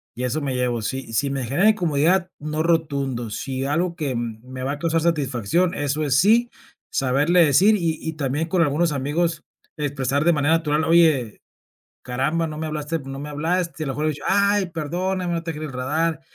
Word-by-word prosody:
y 125 Hz, -, -4 dB
eso 135 Hz, +5 st, -1 dB
me 140 Hz, -2 st, -2 dB
llevo, 120 Hz, -2 st, 0 dB
si 130 Hz, 0 st, -4 dB
si 140 Hz, +5 st, +1 dB
me 135 Hz, -2 st, -2 dB
genera 175 Hz, -, +3 dB
incomodidad, 175 Hz, -1 st, +2 dB
no 155 Hz, +1 st, -3 dB
rotundo, 140 Hz, -8 st, 0 dB
si 135 Hz, +2 st, -3 dB
algo 170 Hz, +5 st, 0 dB
que 145 Hz, -6 st, -2 dB
me 120 Hz, +2 st, -6 dB
va 140 Hz, +2 st, -1 dB
a 145 Hz, -, -7 dB
causar 165 Hz, -1 st, +1 dB
satisfacción, 155 Hz, -, +1 dB
eso 145 Hz, +1 st, -1 dB
es 140 Hz, -3 st, +1 dB
sí, 230 Hz, +6 st, +4 dB, 0.4 s
saberle 145 Hz, +7 st, +3 dB
decir 190 Hz, +10 st, +5 dB
y 165 Hz, -5 st, -1 dB
y 160 Hz, -, -4 dB
también 150 Hz, +1 st, -2 dB
con 175 Hz, 0 st, +1 dB
algunos 165 Hz, +2 st, +2 dB
amigos 155 Hz, +4 st, -1 dB, 0.3 s
expresar 140 Hz, -1 st, -1 dB
de 170 Hz, 0 st, +4 dB
manera 150 Hz, +2 st, +2 dB
natural: 155 Hz, -1 st, 0 dB
"Oye, 160 Hz, -9 st, +3 dB, 0.6 s
caramba, 145 Hz, +7 st, 0 dB
no 155 Hz, -1 st, -6 dB
me 160 Hz, -, -3 dB
hablaste 155 Hz, +1 st, -3 dB
no 135 Hz, 0 st, -7 dB
me 145 Hz, -, -6 dB
hablaste", 165 Hz, +2 st, -1 dB
a -, -, -6 dB
lo 135 Hz, -, -2 dB
mejor, 150 Hz, +3 st, -3 dB
haber 155 Hz, -, +1 dB
dicho: -, -, -11 dB
"Ay, 200 Hz, 0 st, +3 dB
perdóname, 175 Hz, +3 st, -2 dB
no 165 Hz, -, -2 dB
te 165 Hz, -, -4 dB
quería 155 Hz, 0 st, -5 dB
enredar", 150 Hz, +5 st, -1 dB
155 Hz, 195 wpm, -22 LUFS, 135-170 Hz, 0.6 s, decir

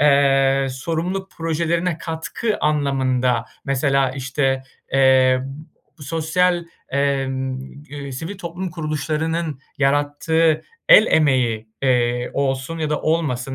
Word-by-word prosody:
eee, 135 Hz, -1 st, +4 dB
sorumluluk 170 Hz, +8 st, -3 dB
projelerine 165 Hz, +1 st, -1 dB
katkı 165 Hz, +7 st, -3 dB
anlamında, 130 Hz, -5 st, +1 dB, 0.2 s
mesela, 135 Hz, -1 st, +1 dB
işte, 135 Hz, 0 st, -1 dB, 0.3 s
eee, 130 Hz, -1 st, +5 dB, 0.6 s
sosyal, 170 Hz, +4 st, 0 dB, 0.2 s
emm, 135 Hz, -2 st, -1 dB, 0.2 s
gü 145 Hz, -1 st, -13 dB
eee, 140 Hz, -, -6 dB
sivil 165 Hz, +9 st, -6 dB
toplum 175 Hz, 0 st, -5 dB
kuruluşlarının 155 Hz, -1 st, -2 dB, 0.2 s
yarattığı 145 Hz, +3 st, +2 dB, 0.3 s
el -, -, +9 dB
emeği, 125 Hz, -7 st, +2 dB
eee, 125 Hz, -1 st, +1 dB
olsun 135 Hz, +3 st, -2 dB
ya 155 Hz, -1 st, -2 dB
da 150 Hz, -, 0 dB
olmasın 135 Hz, -5 st, -1 dB
145 Hz, 100 wpm, -21 LUFS, 130-165 Hz, 0.6 s, el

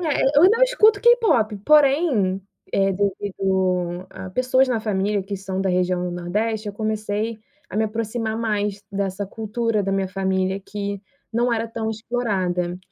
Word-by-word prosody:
É, 315 Hz, -5 st, 0 dB, 0.2 s
eu -, -, +6 dB
ainda 405 Hz, +6 st, +6 dB
eu -, -, +2 dB
escuto 440 Hz, -4 st, +4 dB
K-pop, 430 Hz, -, +4 dB
porém, 275 Hz, -, +3 dB, 0.3 s
eh, 195 Hz, 0 st, +2 dB
devido 185 Hz, -2 st, -1 dB
a 190 Hz, -, -8 dB
pessoas 255 Hz, +5 st, +2 dB
na 240 Hz, -3 st, 0 dB
família 205 Hz, -1 st, 0 dB
que 200 Hz, +1 st, -5 dB
são 190 Hz, 0 st, -4 dB
da 195 Hz, -, 0 dB
região 180 Hz, 0 st, +1 dB
do 180 Hz, -, -3 dB
Nordeste, 210 Hz, +6 st, -2 dB
eu -, -, -5 dB
comecei 215 Hz, +1 st, -2 dB, 0.3 s
a -, -, -6 dB
me 220 Hz, -, +2 dB
aproximar 220 Hz, 0 st, -3 dB
mais 210 Hz, -3 st, -1 dB
dessa 195 Hz, 0 st, -2 dB
cultura 220 Hz, +1 st, -2 dB
da 195 Hz, 0 st, -1 dB
minha 195 Hz, -1 st, 0 dB
família 190 Hz, 0 st, -1 dB
que 200 Hz, 0 st, -5 dB, 0.3 s
não 240 Hz, +2 st, +1 dB
era 230 Hz, 0 st, -1 dB
tão 225 Hz, -1 st, -3 dB
explorada. 195 Hz, -6 st, -2 dB
205 Hz, 165 wpm, -22 LUFS, 190-230 Hz, 0.3 s, eu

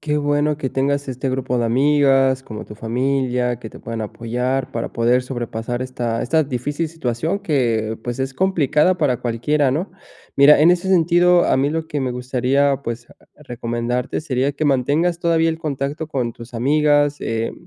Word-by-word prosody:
Qué 150 Hz, 0 st, -1 dB
bueno 145 Hz, +1 st, +1 dB
que 135 Hz, -4 st, -4 dB
tengas 140 Hz, +1 st, -1 dB
este 130 Hz, +1 st, -3 dB
grupo 130 Hz, -1 st, -1 dB
de 120 Hz, -, 0 dB
amigas, 135 Hz, +1 st, +3 dB
como 110 Hz, -3 st, -8 dB
tu 105 Hz, -, -11 dB
familia, 125 Hz, +1 st, -1 dB
que 115 Hz, -2 st, -8 dB
te -, -, -12 dB
puedan 115 Hz, 0 st, -5 dB
apoyar 125 Hz, +4 st, -2 dB
para 115 Hz, -, -4 dB
poder 120 Hz, +2 st, +2 dB
sobrepasar 120 Hz, -1 st, -4 dB
esta 120 Hz, -3 st, -3 dB
esta 160 Hz, +5 st, +2 dB
difícil 145 Hz, +4 st, -3 dB
situación 160 Hz, +2 st, -2 dB
que, 115 Hz, -, 0 dB
pues, 120 Hz, +1 st, -4 dB
es 135 Hz, 0 st, -2 dB
complicada 180 Hz, -1 st, +2 dB
para 140 Hz, -8 st, +1 dB
cualquiera, 130 Hz, +4 st, 0 dB
¿no? 165 Hz, +9 st, -2 dB, 0.5 s
Mira, 140 Hz, +1 st, +7 dB
en 165 Hz, -, +6 dB
ese 180 Hz, +1 st, +1 dB
sentido, 175 Hz, 0 st, +4 dB
a -, -, +2 dB
mí 135 Hz, +2 st, +2 dB
lo 160 Hz, +1 st, -3 dB
que 150 Hz, -, -3 dB
me 130 Hz, -1 st, -1 dB
gustaría, 130 Hz, +3 st, 0 dB
pues, 120 Hz, -1 st, -5 dB, 0.3 s
recomendarte 120 Hz, -2 st, -3 dB
sería 140 Hz, -2 st, -1 dB
que 145 Hz, +2 st, -3 dB
mantengas 145 Hz, +5 st, +1 dB
todavía 165 Hz, -1 st, +2 dB
el 160 Hz, -, -4 dB
contacto 150 Hz, 0 st, -3 dB
con 125 Hz, -6 st, -2 dB
tus 115 Hz, +1 st, -13 dB
amigas, 145 Hz, +3 st, +2 dB
eh, 115 Hz, 0 st, -2 dB
135 Hz, 175 wpm, -20 LUFS, 120-150 Hz, 0.5 s, Mira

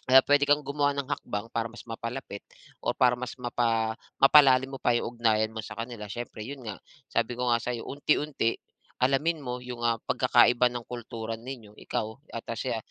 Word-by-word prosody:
ah, 130 Hz, -, +10 dB
puwede 145 Hz, 0 st, +4 dB
kang 145 Hz, 0 st, +4 dB
gumawa 145 Hz, 0 st, 0 dB
ng 140 Hz, 0 st, -3 dB
hakbang 105 Hz, +3 st, -4 dB
para 115 Hz, 0 st, -1 dB
mas 120 Hz, +1 st, -12 dB
mapalapit 115 Hz, -2 st, -6 dB, 0.4 s
o -, -, -1 dB
para 125 Hz, -1 st, +4 dB
mas 125 Hz, -1 st, -5 dB
mapa 115 Hz, -3 st, 0 dB, 0.3 s
mapalalim 135 Hz, -2 st, +7 dB
mo -, -, -26 dB
pa 120 Hz, -, +2 dB
yung 120 Hz, -, -1 dB
ugnayan 110 Hz, -1 st, +2 dB
mo 110 Hz, -, -6 dB
sa 105 Hz, -, -8 dB
kanila, 115 Hz, -2 st, -6 dB
siyempre 120 Hz, +2 st, -7 dB
yun 135 Hz, -1 st, -8 dB
nga, -, -, -10 dB, 0.3 s
sabi 120 Hz, -, 0 dB
ko 125 Hz, -1 st, 0 dB
nga 115 Hz, -, +4 dB
sa'yo, 120 Hz, -1 st, -3 dB
unti-unti, 145 Hz, -4 st, 0 dB, 0.5 s
alamin 150 Hz, +5 st, +2 dB
mo 125 Hz, -1 st, -3 dB
yung, 125 Hz, -1 st, -7 dB
ah, 115 Hz, -1 st, +3 dB
pagkakaiba 120 Hz, +1 st, +4 dB
ng 120 Hz, -1 st, -6 dB
kultura 115 Hz, -2 st, -5 dB
ninyo, 115 Hz, -4 st, -9 dB
ikaw 110 Hz, 0 st, -3 dB, 0.2 s
at 115 Hz, -, -5 dB
siya, 120 Hz, -2 st, -2 dB
120 Hz, 185 wpm, -28 LUFS, 115-135 Hz, 0.5 s, ah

